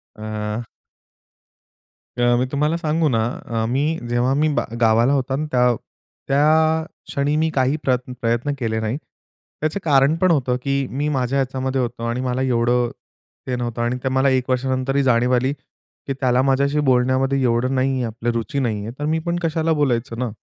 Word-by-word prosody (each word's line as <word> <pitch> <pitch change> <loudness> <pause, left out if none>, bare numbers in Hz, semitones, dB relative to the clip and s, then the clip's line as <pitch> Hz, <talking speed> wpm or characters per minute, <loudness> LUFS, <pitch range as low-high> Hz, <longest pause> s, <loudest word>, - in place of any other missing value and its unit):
अ 110 +1 -4 1.5
अ, 120 0 +3
मी 130 - +1
तुम्हाला 150 +3 +1
सांगू 160 0 +1
ना, 115 -2 +1 0.2
अ, 115 -1 -2
मी 135 +3 +1 0.3
जेव्हा 120 +2 +1
मी 155 - +3
बा - - +1 0.2
गावाला 115 +4 +4
होता 135 -1 0
ना, 155 +2 -2
त्या 125 -1 +3 0.5
त्या 155 +3 +3 0.2
क्षणी 140 +2 0
मी 160 +1 +2
काही 130 +2 +2
प्रयत् 125 -1 0
प्रयत्न 120 +5 0
केले 110 -2 -1
नाही. 110 +5 -2 0.6
त्याचं 155 +6 -1
कारण 140 0 +4
पण 185 -2 +4
होतं 130 -5 +1
की 140 -1 0
मी 145 +3 -2
माझ्या 135 -1 0
याच्यामध्ये 130 0 -1
होतो 120 -1 -4
आणि 120 +2 -1
मला 130 0 -1
एवढं 120 -1 +2 0.6
ते 125 - -1
नव्हतं 120 -1 -3
आणि 120 +2 0
ते 130 - 0
मला 130 +1 +2
1 130 -1 0
वर्षानंतरही 130 +2 0
जाणीव 125 -1 +3
आली, 130 +3 +1
की 140 -1 -11
त्याला 130 -1 +2
माझ्याशी 140 +2 +2
बोलण्यामध्ये 130 +2 +2
एवढं 125 +2 +1
नाही 130 +1 +1
आहे, 130 - -1
आपलं 115 +1 -2
रुची 115 +4 -2
नाही 110 -5 -1
आहे. 115 - -5
तर 145 - -2
मी 160 +1 +1
पण 170 0 0
कशाला 160 0 +1
बोलायचं 125 -5 0
ना. 125 -2 -1
130 Hz, 180 wpm, -21 LUFS, 120-140 Hz, 1.5 s, गावाला